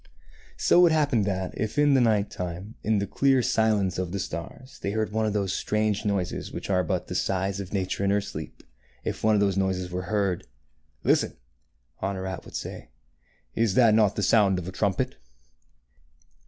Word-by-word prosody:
So 175 - +5
it - - +3
happened 145 -9 +2
that, 95 -2 -2
if 110 +5 -3
in 145 -1 +5
the 135 - +5
night 105 -3 +2
time, 90 +4 -5
in 110 -1 +1
the 100 - 0
clear 135 +5 +2
silence 105 -6 +1
of 90 -2 -2
the 100 - -2
stars, 95 - -7
they 100 - -2
heard 110 -1 -1
one 110 0 0
of 105 - -1
those 100 -3 0
strange 105 0 0
noises 100 -3 -2
which - - -5
are 90 -1 +3
but 80 - -2
the - - -6
sighs 95 +1 -1
of 95 -2 -6
Nature 95 0 -1
in - - +2
her 100 +1 +3
sleep, 100 - -8 0.2
— 65 - -34
if - - -3
one 110 0 +4
of 100 - +2
these 100 -2 +2
noises 95 -2 -1
were 90 +1 -2
heard, 100 -4 0 0.3
" - - -41
Listen," - - +1 0.6
Honorat 95 -1 -3
would - - -11
say, - - -6 0.3
" - - -42 0.3
is 110 -4 +1
not 115 -4 +6
that 105 -2 +4
the 105 - -1
sound 100 -4 +4
of 90 -1 -5
a - - -4
trumpet 100 +6 -1
100 Hz, 200 wpm, -26 LUFS, 95-110 Hz, 0.6 s, not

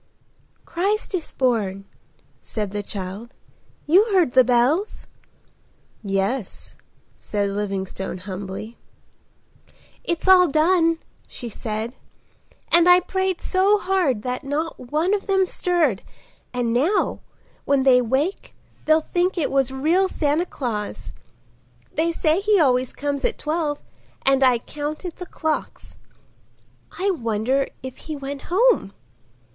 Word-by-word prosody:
"Christ 400 +5 -1
is 350 -4 -3
born," 205 -7 0 0.6
said 210 -3 -4
the 205 0 -3
child. 200 +4 -7 0.5
"You 370 +8 +5
heard 370 - +2
the 260 0 +6
bells?" 255 - +1 1.0
"Yes," 195 +3 -2 0.4
said 205 -1 -2
Livingstone 195 -2 -3
humbly. 190 +4 -7 1.2
"It's 340 +2 -2
all 370 -1 +7
done," 330 +2 +3 0.3
she 240 - -7
said; 220 +2 -4 0.8
"and 340 +1 +6
I 355 0 +8
prayed 375 0 -2
so 390 +2 +3
hard 360 - 0
that 250 0 -3
not 300 +4 -3
one 305 +10 0
of 410 0 -2
them 385 -1 +3
stirred, 340 - 0 0.5
and 245 -2 -1
now 310 - +1 0.5
when 275 -1 +2
they 255 -2 +6
wake 270 - -1 0.3
they'll 315 0 +3
think 360 +2 +1
it 320 - 0
was 270 -2 +3
real 325 +8 +2
Santa 315 0 0
Claus. 220 -9 -4 0.8
They 330 +2 +1
say 320 +1 +1
he 410 0 +3
always 255 -4 +2
comes 285 -1 -3
at - - 0
twelve 305 -1 -2 0.4
and 270 0 +4
I 255 -2 +5
counted 300 +7 -6
the 360 - -7
clocks.—I 340 +4 -6
wonder 245 - 0 0.2
if 260 -1 -7
he 310 - -7
went 280 0 -6
home?" 405 - +3
285 Hz, 120 wpm, -22 LUFS, 235-350 Hz, 1.2 s, I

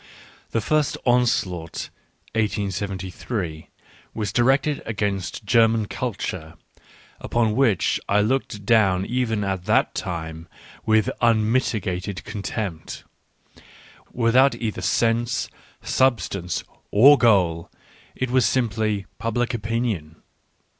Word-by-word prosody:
The 115 - -1
first 155 +5 +1
onslaught 110 -9 0 0.4
(1873) 100 -4 -3 0.5
was 105 -3 -3
directed 135 +4 +2
against 100 -3 -3
German 115 0 +3
culture, 95 -10 -4 0.6
upon 115 -2 0
which 120 -9 +2
I 100 - +4
looked 105 -3 -1
down 100 -4 +3
even 115 -3 -1
at 95 -2 -3
that - - +2
time 80 -2 -5 0.4
with 110 -1 +3
un 110 -2 +3
mitigated 100 -6 -1
contempt 100 -4 -5 1.1
Without 125 +3 +3
either 110 -3 -4
sense, 115 0 +1 0.3
sub 130 -3 +3
stance, 90 -4 -4 0.3
or 135 +8 +7
goal, 90 - +2 0.5
it 130 -1 -2
was 125 -4 +4
simply 110 -5 0
"public 120 +2 -1
opinion." 110 -8 -2
110 Hz, 100 wpm, -23 LUFS, 95-120 Hz, 1.1 s, or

